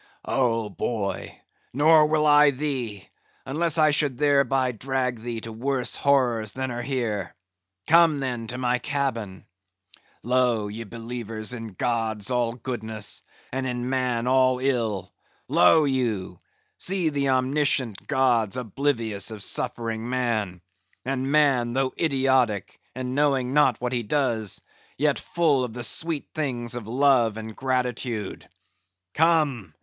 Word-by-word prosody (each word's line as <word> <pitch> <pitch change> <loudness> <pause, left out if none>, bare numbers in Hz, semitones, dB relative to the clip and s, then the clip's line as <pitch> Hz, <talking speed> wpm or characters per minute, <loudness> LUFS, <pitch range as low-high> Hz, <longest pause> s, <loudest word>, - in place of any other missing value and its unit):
"Oh, 115 -4 +1
boy, 100 -3 -3 0.3
nor 155 +3 +5
will 155 0 +2
I 150 0 +7
thee, 130 -8 -3 0.4
unless 160 +4 0
I 155 -1 +5
should 145 -4 0
thereby 140 -3 +2
drag 125 +1 -2
thee 115 0 -5
to 115 - -7
worse 130 +2 -1
horrors 120 -6 +1
than 130 -1 -3
are 120 0 -4
here. 115 -8 -3 0.5
Come, 165 -2 +5
then, 125 -4 -3
to 125 - -4
my 125 -1 +1
cabin. 120 -10 -3 0.8
Lo! 120 -3 +1
ye 115 +3 -6
believers 115 0 -5
in 115 -2 -6
gods 110 0 -1
all 120 -2 +1
goodness, 110 -4 -4 0.3
and 130 0 -2
in 125 0 -3
man 125 -3 0
all 130 0 +3
ill, 120 -7 -1 0.3
lo 120 - +5
you! 115 -10 -1 0.4
see 185 -3 +1
the 140 -2 0
omniscient 130 -3 0
gods 125 -6 +2
oblivious 115 -4 -2
of 110 -3 -7
suffering 115 +1 -2
man; 110 -8 -1 0.4
and 135 +1 -2
man, 135 -6 +3
though 130 0 0
idiotic, 130 - +1 0.2
and 130 0 -4
knowing 135 -3 +1
not 145 -5 +4
what 125 +1 -2
he 120 - 0
does, 115 -4 -1 0.4
yet 145 0 +1
full 155 -6 +1
of 120 -3 -4
the 120 0 -5
sweet 160 +6 -2
things 125 -6 -2
of 120 -3 -5
love 125 -3 +3
and 110 -1 -7
gratitude. 125 -5 -2 0.6
Come! 150 - +1
125 Hz, 135 wpm, -25 LUFS, 115-140 Hz, 0.8 s, I